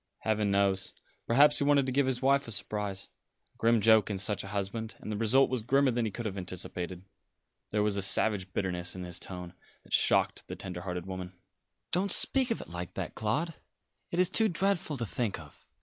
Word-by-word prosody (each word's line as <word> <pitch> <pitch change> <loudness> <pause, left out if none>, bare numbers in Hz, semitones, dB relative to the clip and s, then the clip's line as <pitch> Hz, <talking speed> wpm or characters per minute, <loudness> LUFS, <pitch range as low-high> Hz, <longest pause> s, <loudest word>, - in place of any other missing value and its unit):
"Heaven 110 -2 0
knows. 100 -1 +1 0.3
Perhaps 145 +5 +5
he - - +1
wanted 140 -1 +4
to 130 - -2
give 135 +1 +2
his 130 -1 -2
wife 140 0 +3
a - - -5
surprise 100 -1 -2 0.5
a - - -32
grim 115 0 +3
joke 110 -1 +5
in 100 - -2
such 100 +1 0
a - - -8
husband; 105 +3 -4
and 110 - -7
the - - -2
result 115 +6 +4
was 130 -3 -2
grimmer 135 +4 +3
than 120 -1 0
he - - -1
could 120 +4 -6
have 100 -2 -3
anticipated." 90 0 -5 0.7
There 105 0 +1
was 105 -1 0
a - - 0
savage 95 -1 +2
bitterness 90 -2 -1
in 90 - -6
his 90 0 -5
tone 90 -2 -7 0.3
that - - -11
shocked - - +2
the - - -6
tender 90 -2 -6
hearted 90 -1 -4
woman. 95 -1 -6 0.6
"Don't 190 +2 +1
speak 260 +5 +4
of 230 - -1
it - - -11
like 90 0 -6
that, - - -4
Claude. 150 +11 -1 0.6
It 170 - -4
is 180 0 +3
too 220 +2 +5
dreadful 175 -4 0
to 120 - -2
think 110 -4 -2
of. 75 -2 -15
105 Hz, 210 wpm, -30 LUFS, 95-130 Hz, 0.7 s, Perhaps